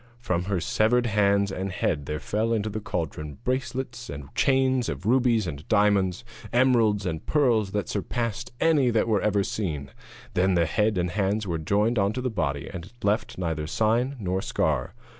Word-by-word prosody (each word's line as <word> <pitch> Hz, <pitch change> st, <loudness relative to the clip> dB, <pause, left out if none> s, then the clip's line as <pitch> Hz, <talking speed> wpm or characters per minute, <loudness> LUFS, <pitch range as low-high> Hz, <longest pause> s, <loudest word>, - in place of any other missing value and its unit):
From 90 Hz, -7 st, -2 dB
her 100 Hz, -2 st, 0 dB
severed 115 Hz, +8 st, +2 dB
hands 100 Hz, -2 st, +2 dB
and 95 Hz, 0 st, -3 dB
head 75 Hz, -5 st, -1 dB
there 75 Hz, 0 st, -3 dB
fell 110 Hz, +6 st, -1 dB
into 110 Hz, -1 st, -1 dB
the 110 Hz, -, -3 dB
cauldron 75 Hz, -6 st, -4 dB
bracelets 130 Hz, -1 st, -3 dB
and 70 Hz, 0 st, -8 dB
chains 130 Hz, -2 st, +2 dB
of -, -, -5 dB
rubies 120 Hz, -2 st, +3 dB
and 75 Hz, -2 st, -6 dB
diamonds, 100 Hz, -2 st, +2 dB, 0.3 s
emeralds 115 Hz, -5 st, +3 dB
and 80 Hz, -3 st, -3 dB
pearls 120 Hz, -9 st, +2 dB
that 105 Hz, -1 st, -1 dB
surpassed 115 Hz, +3 st, -3 dB
any 150 Hz, -6 st, +4 dB
that 115 Hz, -1 st, +1 dB
ever 105 Hz, -1 st, +2 dB
were 100 Hz, -, +3 dB
seen. 75 Hz, -10 st, -3 dB, 0.4 s
Then 95 Hz, +1 st, +2 dB
the 85 Hz, -1 st, +3 dB
head 105 Hz, +5 st, +1 dB
and 90 Hz, 0 st, 0 dB
hands 100 Hz, +2 st, 0 dB
were 85 Hz, -4 st, -2 dB
joined 105 Hz, +8 st, +1 dB
on 100 Hz, +2 st, +2 dB
to 125 Hz, -, -3 dB
the 125 Hz, -1 st, -2 dB
body, 70 Hz, -8 st, -2 dB
and 90 Hz, +1 st, -8 dB
left 105 Hz, +3 st, 0 dB
neither 80 Hz, -4 st, -2 dB
sign 115 Hz, -, +1 dB
nor 95 Hz, -2 st, -1 dB
scar. -, -, -1 dB
105 Hz, 180 wpm, -26 LUFS, 90-120 Hz, 0.4 s, any